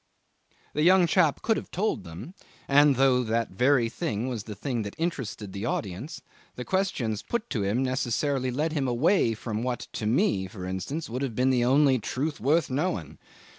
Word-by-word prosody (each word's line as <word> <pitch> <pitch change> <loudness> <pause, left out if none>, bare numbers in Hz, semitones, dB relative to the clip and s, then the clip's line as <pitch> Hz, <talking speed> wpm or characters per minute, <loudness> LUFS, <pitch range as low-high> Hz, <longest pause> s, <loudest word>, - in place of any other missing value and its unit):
'The 150 - 0
young 180 +2 +6
chap 165 -4 +2
could 225 - +2
have - - -6
told 200 - -1
them, 90 - -9 0.3
and, 145 0 +5
though 130 -1 +4
that 115 -1 -1
very 125 +4 +3
thing 115 0 -3
was 120 -5 -4
the 105 - -7
thing 120 +2 -2
that 100 -1 -6
interested 125 - -3
the 100 - -5
audience, 110 - -4 0.3
the 125 - -6
questions 135 - -1
put 235 -1 -3
to 115 - -1
him 105 +6 0
necessarily 130 +1 0
led 150 +6 -1
him 140 -4 0
away 125 - +2
from 110 0 -4
what 125 0 -2
to 110 -2 -3
me, 120 - +2
for 95 -1 -8
instance, 95 - -4
would 125 +3 -4
have 130 -5 -3
been 130 +2 +3
the 125 -2 +2
only 135 +1 +4
truth 145 +7 -3
worth 155 +5 +2
knowing. 110 - -2
125 Hz, 185 wpm, -27 LUFS, 110-150 Hz, 0.3 s, young